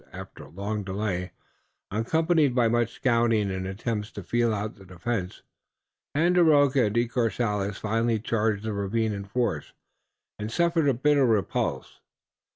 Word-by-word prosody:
After - - -10
a - - -15
long 105 +3 -4
delay, 95 -2 -3 0.6
accompanied 155 - +2
by 120 -2 +4
much 120 0 +1
scouting 115 -5 +2
and 95 0 -3
attempts 105 +2 -3
to - - -7
feel 120 -1 +1
out 105 +1 -3
the 100 - -16
defense, 90 +2 -4 0.7
Tandakora 150 -6 +4
and 105 - -4
De 120 0 +2
Courcelles 105 -4 -1
finally 115 +1 0
charged 110 -1 -1
the 110 -1 -2
ravine 105 +2 -1
in 100 -1 -5
force 120 +4 -2 0.7
and 105 +1 -4
suffered 170 0 +2
a 135 - +2
bitter 140 +1 +3
repulse. 110 -4 -1
115 Hz, 145 wpm, -26 LUFS, 100-125 Hz, 0.7 s, by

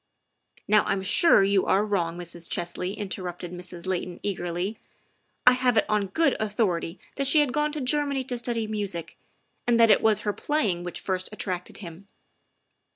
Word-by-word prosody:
" - - -32
Now 210 0 +5
I'm 195 -1 -1
sure 335 - +5
you 195 -1 +2
are 195 +2 +3
wrong, 175 -5 -1
Mrs. 170 -1 -6
Chesley," 180 +3 -3
inter 200 -2 -3
rupted 175 -1 -6
Mrs. 180 -1 -7
Layton 180 -1 -3
eagerly. 180 +1 -3 0.3
" - - -44
I 250 - +9
have 250 -2 +2
it - - +4
on 210 -2 +1
good 280 - +2
authority 200 -5 -1 0.2
that 275 -1 +2
she 305 - +5
had 285 -4 +2
gone 300 0 +1
to 305 - -3
Germany 280 0 +1
to 250 -1 -4
study 235 -2 -1
music, 200 -6 -4 0.5
and 235 -1 +3
that 230 -1 +7
it - - +5
was 220 -2 +3
her 205 - -1
playing 205 - -1
which 175 - -6
first 185 -1 -3
attracted 185 -4 -4
him." 170 +4 -11
200 Hz, 185 wpm, -26 LUFS, 180-240 Hz, 0.5 s, I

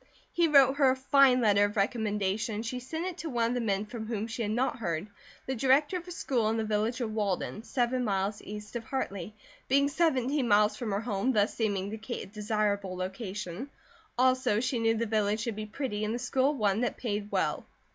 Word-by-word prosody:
He 340 -1 +3
wrote 275 -3 +6
her 275 -3 +5
a 260 - +3
fine 265 -1 +4
letter 205 -3 +4
of 205 +1 -4
recommendation 210 -1 0
and 220 +3 -4
she 250 +2 -3
sent 320 +7 -4
it 370 -2 -4
to 325 - -4
one 235 -3 +1
of - - -1
the 245 - -1
men 205 -2 0
from 220 0 -7
whom 220 -2 -2
she 230 +1 -5
had 210 - -1
not 245 +4 0
heard, 170 -4 -2 0.4
the 265 - -2
director 270 +6 +3
of 355 0 -9
a - - -7
school 245 -9 0
in 225 - 0
the 225 - 0
village 220 +3 -1
of 220 -2 -2
Walden, 210 -1 -2
seven 250 +1 0
miles 200 -1 -1
east 210 +2 -8
of 235 - -3
Hartley, 210 -6 -4 0.3
being 280 +2 +3
seventeen 280 -4 +1
miles 210 0 +4
from 240 -4 -4
her 200 +1 0
home, 225 +2 0
thus 210 -1 +2
seeming 200 -3 -1
to 220 - -5
Kate 230 +3 -5
a - - -8
desirable 205 -2 -1
location, 190 +4 -5 0.5
also 255 -4 +3
she 255 0 -1
knew 225 0 +2
the 230 - 0
village 210 -1 0
to 235 - -1
be 215 0 -6
pretty 215 -2 -3
and 215 +2 -1
the - - -1
school 260 +3 +1
one 210 -3 +1
that 245 - -1
paid 210 -3 -3
well. - - -1
225 Hz, 220 wpm, -29 LUFS, 210-255 Hz, 0.5 s, wrote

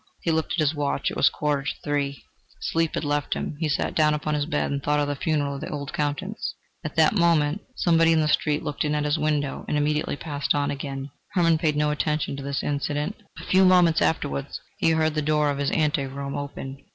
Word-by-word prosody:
He 165 - 0
looked 160 0 0
at - - -1
his 155 -1 +2
watch: 145 -2 -1
it - - -6
was - - +4
a - - +3
quarter 150 -2 0
to 140 - -2
three. 140 -2 -2 0.4
Sleep 165 -1 0
had - - -2
left 145 0 0
him; - - -4
he 160 -2 0
sat 140 - 0
down 150 -1 +3
upon 150 0 -2
his 145 0 0
bed - - -1
and 140 0 -2
thought 150 +1 +1
of 145 - +1
the 145 - -1
funeral 145 -1 0
of 140 - -6
the - - -5
old 140 -1 -5
Countess. 150 +8 -2 0.3
At 155 - -5
that 160 -1 +5
moment 170 -2 +2
somebody 165 -1 +4
in 160 - +4
the 155 - +2
street 150 0 +1
looked 145 - -2
in 150 0 0
at 150 0 0
his 150 +2 +1
window, 150 -2 -1
and 150 - 0
immediately 150 0 0
passed 145 -1 -2
on 145 0 0
again. 135 -1 -5 0.2
Hermann 165 -3 +3
paid 155 -2 +1
no 150 0 +2
attention 150 -1 -1
to 140 - -6
this 140 0 -3
incident. 145 +5 -2 0.2
A - - -9
few 190 +1 +4
moments 180 -3 +5
afterwards 70 - -1 0.2
he - - +3
heard 160 -1 +2
the 155 - 0
door 150 0 +2
of 140 - -4
his 140 - +1
ante 150 -3 +1
room 140 +1 -5
open. 140 -1 -6
150 Hz, 235 wpm, -25 LUFS, 145-160 Hz, 0.4 s, that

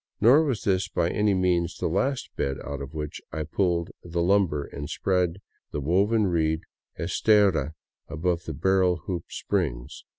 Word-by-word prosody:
Nor 140 +8 +6
was 130 -7 -1
this 95 -2 +1
by 85 -1 0
any 105 -1 +2
means 90 -2 +1
the - - -3
last 130 - -1
bed 70 -1 -1
out 70 -1 -5
of 70 +3 -8
which 75 -1 -5
I 80 0 -3
pulled 85 +1 0
the 85 0 -2
lumber 90 -6 +2
and 70 +1 -7
spread 90 -1 0 0.3
the - - -4
woven 100 +9 +2
reed 80 -3 +1 0.4
estera 85 -4 +3 0.3
above 85 +1 -1
the 80 - -5
barrel 95 +3 +3
hoop 90 -3 -3
springs. - - -3
85 Hz, 160 wpm, -26 LUFS, 80-95 Hz, 0.4 s, Nor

